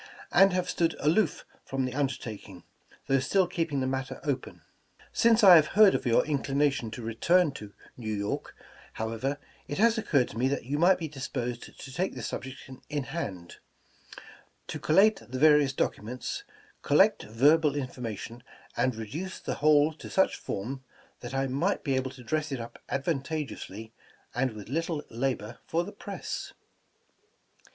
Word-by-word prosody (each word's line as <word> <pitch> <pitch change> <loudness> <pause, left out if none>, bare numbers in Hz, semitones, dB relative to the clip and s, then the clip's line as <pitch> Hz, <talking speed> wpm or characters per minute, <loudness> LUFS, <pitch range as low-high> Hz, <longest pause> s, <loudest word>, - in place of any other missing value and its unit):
and 195 0 +6
have 180 0 0
stood 165 -1 0
aloof 165 +3 +1 0.2
from 135 -1 -2
the 130 - -4
undertaking, 115 -8 -4 0.4
though 135 0 +3
still 185 +8 +2
keeping 165 -6 -2
the - - 0
matter 130 0 -3
open. 140 -4 -3 0.5
''Since 230 -1 +4
I 185 -3 +11
have 155 +5 +1
heard 210 -3 +8
of - - -1
your 115 - +4
inclination 140 -4 0
to 125 - -7
return 155 +9 +3
to 105 -7 -10 0.2
New 110 -3 -4
York, 100 0 -3 0.4
however, 115 +6 -2 0.3
it 145 - -4
has 230 +2 +4
occurred 145 - +2
to 115 - -7
me 130 - +3
that 140 -3 -2
you 145 +4 -2
might 180 +3 +5
be 165 - -4
disposed 125 -4 -5
to 135 - -9
take 185 +7 -1
this - - -5
subject 130 +1 -6 0.2
in 145 -2 -2
hand; 95 - -6 1.1
to - - -4
col 155 - 0
late 210 +3 +5
the 130 - -4
various 150 -1 +5
documents, 125 - -3 0.4
collect 190 +9 +4
verbal 145 +7 +3
information, 120 -4 -5 0.3
and 130 -2 +1
reduce 150 - -5
the - - -5
whole 150 +1 +5
to 155 - -10
such 190 - +2
form 130 +7 -5 0.4
that 120 +2 -7
I 135 0 +1
might 140 +10 0
be 135 -4 0
able 130 0 -1
to 130 -1 -12
dress 155 +2 -1
it 135 - -2
up 115 0 -8
advantageously, 135 - -3 0.4
and 130 -1 0
with 105 -2 -9
little 160 +3 -2
labor, 120 -2 -2
fox* 170 +2 0
the 205 - -7
press. 205 -1 -6
135 Hz, 160 wpm, -28 LUFS, 125-165 Hz, 1.1 s, I